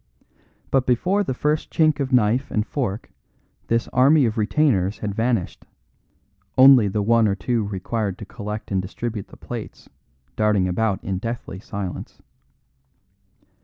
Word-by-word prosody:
But 130 -2 +2
before 185 - +2
the 130 -9 -3
first 150 +3 -1
chink 155 -2 +2
of 135 -1 -2
knife 125 +2 +2
and 105 -1 -1
fork 115 -7 -4 0.6
this 115 0 0
army 135 +3 +4
of 110 -1 -1
retainers 110 - +1
had 105 -2 -4
vanished, 115 -3 -1 0.9
only 130 -4 +8
the 100 +1 -1
one 115 +1 +4
or 100 - +1
two 105 +3 -1
required 100 +1 -3
to 105 - -8
collect 105 0 -7
and 95 -1 +1
distribute 105 +2 -5
the - - -15
plates - - -8 0.5
darting 105 -3 +2
about 100 +2 -1
in 95 -1 -3
deathly 115 -4 -5
silence. 95 -3 -6
110 Hz, 140 wpm, -22 LUFS, 100-125 Hz, 0.9 s, only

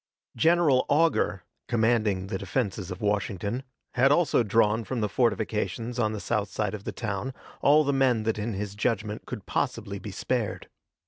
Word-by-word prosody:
General 160 -1 +4
Augur, 145 - +2 0.2
commanding 110 -5 +2
the 95 0 -4
defenses 100 -7 -2
of 90 - -6
Washington, 105 +3 -1 0.3
had 130 +2 +4
also 150 -4 +4
drawn 110 0 +2
from 125 +3 -3
the 105 - +1
fortifications 110 +1 -1
on 110 -2 +2
the 110 - -4
south 105 -2 -1
side 105 +1 -2
of 105 -2 -7
the - - -2
town 115 +4 -4 0.3
all 150 +2 +6
the 140 -1 +1
men 130 -5 +3
that 110 0 -1
in 110 +2 -2
his 100 0 -4
judgment 105 0 -2
could - - -6
possibly 100 0 -2
be 105 - -7
spared. 110 +3 -2
110 Hz, 170 wpm, -27 LUFS, 100-125 Hz, 0.3 s, all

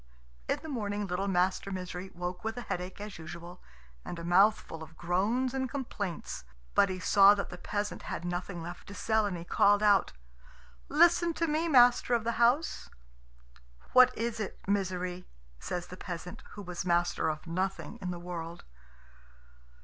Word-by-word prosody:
In - - +1
the - - -7
morning 210 -7 -2
little 190 +1 -2
Master 185 +1 +1
Misery 185 0 -5
woke 180 +1 -4
with 225 +1 -3
a - - -3
headache 180 -1 -4
as 205 -3 -7
usual, 170 +2 -9 0.4
and 175 - -6
a 170 - -7
mouthful 180 -1 +3
of 160 0 -11
groans 210 +9 0
and 260 -1 -1
complaints. 215 -9 -4 0.3
But 200 - +4
he 185 - -3
saw 200 +2 +7
that 200 - -4
the 180 - -7
peasant 205 +2 -3
had 175 - -5
nothing 175 0 -4
left 175 +1 -8
to 200 - -9
sell, 220 -1 +1
and 185 -3 -3
he 170 - -7
called 205 +4 +4
out, 205 -2 +4 0.8
"Listen 340 +2 +4
to 335 - +1
me, 320 +1 0
master 245 -4 +5
of 230 - 0
the 235 +1 -1
house." 260 +8 +2 1.0
"What 255 0 +8
is 230 0 -2
it, 210 - -4
Misery?" 185 -2 -1 0.3
says 175 - -4
the 180 +1 -10
peasant, 180 -2 -7
who 205 - -8
was 180 -1 -5
master 175 -2 +1
of 155 +1 -4
nothing 190 +6 -3
in 185 - -3
the 175 - -3
world. 170 -1 -6
190 Hz, 170 wpm, -30 LUFS, 175-225 Hz, 1.0 s, What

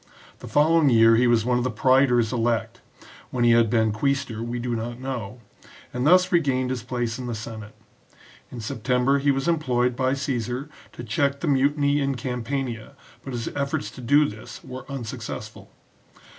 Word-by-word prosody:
The - - -10
following 155 0 +4
year 115 -1 +6
he 125 +2 +3
was 115 -2 +3
one 125 0 +2
of - - -1
the 130 - 0
praetors 125 -1 +3
elect 115 -2 -1 0.5
(when 125 -1 -1
he 120 - +5
had 115 -1 +4
been 110 -1 +2
quaestor 115 0 -1
we 120 +1 -4
do 120 0 -2
not 120 +2 -5
know), 125 -3 -6 0.5
and 125 +3 0
thus 185 +2 +5
regained 135 -7 +1
his 130 -3 -3
place 120 -1 -3
in 125 - -5
the 120 - -3
Senate. 110 -1 -8 0.7
In 120 - -8
September 125 +5 0
he 140 +1 +1
was 135 +1 0
employed 125 -7 +1
by 130 +1 +1
Caesar 130 0 -3 0.2
to 120 - -8
check 140 +5 -1
the 170 - -2
mutiny 140 +1 +2
in 135 -1 0
Campania, 125 0 -4 0.3
but 135 - -7
his 120 -2 -3
efforts 140 +1 -3
to 130 - -11
do 145 +5 +4
this - - -10
were 130 +1 -9
unsuccessful. 125 -5 -7
125 Hz, 175 wpm, -24 LUFS, 115-140 Hz, 0.7 s, year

